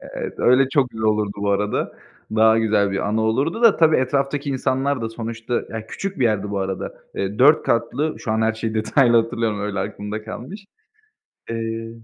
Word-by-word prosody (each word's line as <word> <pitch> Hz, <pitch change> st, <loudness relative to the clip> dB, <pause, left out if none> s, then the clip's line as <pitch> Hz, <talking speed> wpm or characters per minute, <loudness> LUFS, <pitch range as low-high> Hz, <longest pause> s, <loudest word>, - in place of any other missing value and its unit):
Evet, -, -, -5 dB
öyle 130 Hz, +2 st, +4 dB
çok 135 Hz, -2 st, +1 dB
güzel 110 Hz, -1 st, -5 dB
olurdu 105 Hz, -1 st, +1 dB
bu 100 Hz, 0 st, -1 dB
arada. 105 Hz, +1 st, -1 dB, 0.4 s
Daha 110 Hz, 0 st, +5 dB
güzel 105 Hz, -3 st, +2 dB
bir 95 Hz, +1 st, -2 dB
anı 110 Hz, +2 st, 0 dB
olurdu 135 Hz, -, 0 dB
da, 230 Hz, -3 st, +6 dB
tabii, 160 Hz, -1 st, +4 dB
etraftaki 140 Hz, +2 st, 0 dB
insanlar 135 Hz, 0 st, 0 dB
da 115 Hz, -, -2 dB
sonuçta, 115 Hz, +1 st, -5 dB, 0.2 s
ya 110 Hz, -1 st, -6 dB
küçük 195 Hz, -, -5 dB
bir 130 Hz, -, +2 dB
yerdi 105 Hz, -3 st, 0 dB
bu 100 Hz, -, -2 dB
arada. 95 Hz, -1 st, -4 dB, 0.2 s
Eee, 100 Hz, +2 st, -3 dB
4 150 Hz, +4 st, +6 dB
katlı, 120 Hz, +7 st, 0 dB
şu 110 Hz, -, -3 dB
an 110 Hz, 0 st, +1 dB
her 110 Hz, 0 st, +2 dB
şeyi 110 Hz, 0 st, -4 dB
detaylı 120 Hz, +3 st, +3 dB
hatırlayamıyorum, 110 Hz, -2 st, 0 dB
öyle 95 Hz, -, -2 dB
aklımda 105 Hz, +1 st, -6 dB
kalmış. 140 Hz, -, -8 dB, 0.9 s
Eee 115 Hz, 0 st, -4 dB
115 Hz, 185 wpm, -21 LUFS, 110-135 Hz, 0.9 s, da